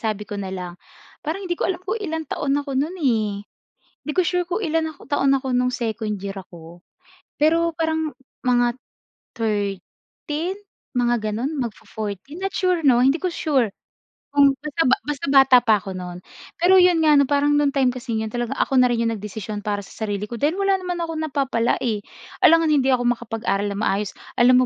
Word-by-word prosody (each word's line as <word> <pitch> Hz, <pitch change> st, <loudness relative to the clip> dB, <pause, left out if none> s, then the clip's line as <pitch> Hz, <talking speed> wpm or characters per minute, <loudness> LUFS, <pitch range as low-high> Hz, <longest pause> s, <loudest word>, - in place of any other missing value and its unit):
sabi 215 Hz, -2 st, -2 dB
ko 205 Hz, -, -6 dB
na 190 Hz, -, -4 dB
lang 180 Hz, -1 st, -5 dB, 0.5 s
parang 355 Hz, +6 st, -3 dB
hindi 350 Hz, -2 st, -2 dB
ko -, -, -2 dB
alam 360 Hz, -2 st, -2 dB
kung 400 Hz, +4 st, -1 dB
ilang 320 Hz, -5 st, -3 dB
taon 275 Hz, -2 st, -1 dB
ako 285 Hz, -1 st, -3 dB
no'n 305 Hz, +7 st, -1 dB
eh. 230 Hz, -7 st, +2 dB, 0.8 s
'Di 300 Hz, -, -3 dB
ko -, -, +5 dB
sure 360 Hz, +1 st, 0 dB
kung 365 Hz, +4 st, -1 dB
ilan 320 Hz, -1 st, 0 dB
ako -, -, -25 dB
taon 275 Hz, -1 st, +2 dB
ako 265 Hz, -1 st, 0 dB
no'ng 250 Hz, 0 st, +1 dB
second 220 Hz, -3 st, -2 dB
year 195 Hz, 0 st, -5 dB
ako, 175 Hz, -2 st, -11 dB, 0.6 s
pero 330 Hz, +3 st, +3 dB
parang 320 Hz, -2 st, -1 dB, 0.3 s
mga 245 Hz, -1 st, +2 dB, 0.6 s
13 225 Hz, -, -3 dB, 0.4 s
mga 240 Hz, 0 st, +3 dB, 0.2 s
gano'n, 240 Hz, +7 st, -2 dB
magfo-14 220 Hz, -, -6 dB
not 390 Hz, 0 st, -2 dB
sure 365 Hz, -3 st, +1 dB
'no, 245 Hz, -3 st, +5 dB
hindi 270 Hz, +5 st, +4 dB
ko 365 Hz, -, 0 dB
sure, 270 Hz, -10 st, +1 dB, 0.6 s
kung 280 Hz, -1 st, +6 dB
basta 305 Hz, +3 st, -3 dB, 0.2 s
basta 295 Hz, -2 st, -3 dB
bata 270 Hz, -2 st, +7 dB
pa 220 Hz, -3 st, +4 dB
ako 190 Hz, -1 st, -6 dB
no'n. 180 Hz, -1 st, -7 dB, 0.4 s
Pero 365 Hz, +3 st, +5 dB
'yon 355 Hz, -2 st, +4 dB
nga 300 Hz, -, +6 dB
'no, 280 Hz, -, +5 dB
parang 290 Hz, 0 st, +3 dB
no 290 Hz, -1 st, +3 dB
time 270 Hz, -2 st, +2 dB
kasi 240 Hz, -3 st, -4 dB
'yon 220 Hz, 0 st, -2 dB
talaga 240 Hz, +1 st, -2 dB
ako 270 Hz, -, +1 dB
na 250 Hz, -, +4 dB
rin 235 Hz, -1 st, 0 dB
'yong 230 Hz, -, +1 dB
nagdesisyon 210 Hz, 0 st, -6 dB
para 205 Hz, -1 st, -1 dB
sa 220 Hz, -, -6 dB
sarili 205 Hz, 0 st, -2 dB
ko 235 Hz, +2 st, -7 dB
dahil 310 Hz, +5 st, +1 dB
wala 395 Hz, -1 st, +2 dB
naman 355 Hz, -1 st, -3 dB
akong 325 Hz, -1 st, -3 dB
napapala, 270 Hz, -6 st, 0 dB
eh. 220 Hz, -4 st, -1 dB, 0.4 s
Alangan 330 Hz, -2 st, +6 dB
hindi 270 Hz, -3 st, +3 dB
ako 250 Hz, -2 st, +2 dB
makapag-aral 220 Hz, -3 st, -2 dB
na 200 Hz, -, -4 dB
maayos. 205 Hz, -1 st, -1 dB, 0.3 s
Alam 255 Hz, +1 st, +6 dB
260 Hz, 190 wpm, -22 LUFS, 220-315 Hz, 0.8 s, bata